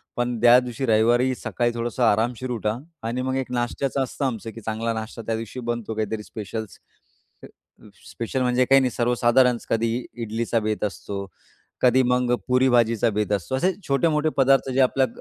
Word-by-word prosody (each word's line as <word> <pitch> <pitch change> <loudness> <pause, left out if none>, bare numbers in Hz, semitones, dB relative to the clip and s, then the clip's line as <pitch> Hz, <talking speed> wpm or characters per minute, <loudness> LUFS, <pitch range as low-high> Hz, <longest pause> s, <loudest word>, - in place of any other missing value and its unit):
पण 120 -1 -1
त्या 120 +1 +8
दिवशी 125 +1 -4
रविवारी 120 +3 +3
सकाळी 120 0 -1
थोडंसं 120 +1 -2
आरामशीर 115 +3 +1
उठा 110 -2 -1 0.3
आणि 120 +2 -2
मग 130 0 -2
एक 130 -1 -4
नाश्त्याचं 125 +3 -1
असतं 135 +2 -4
आमचं, 115 -3 -3
की 115 - -11
चांगला 115 +1 -2
नाश्ता 110 +1 -6
त्या 115 0 -2
दिवशी 115 +3 -6
बनतो, 120 -2 -3
काहीतरी 110 0 -3
स्पेशल्स 110 0 -7 1.3
स्पेशल 120 +3 -3
म्हणजे 125 0 +2
काही 135 +1 +5
नाही, 130 -1 0
सर्वसाधारण 120 +1 +3
कधी 115 +2 0
इडलीचा 115 0 -2
बेत 110 -1 -2
असतो, 100 -1 -4 0.6
कधी 130 +1 +4
मग 125 0 +2
पुरी-भाजीचा 120 -3 +3
बेत 105 0 -1
असतो. 100 +6 -2
असे 180 +8 +1
छोटे-मोठे 150 +3 +2
पदार्थ, 135 0 +4
जे 130 - 0
आपल्या 130 +1 +3
120 Hz, 160 wpm, -23 LUFS, 115-130 Hz, 1.3 s, त्या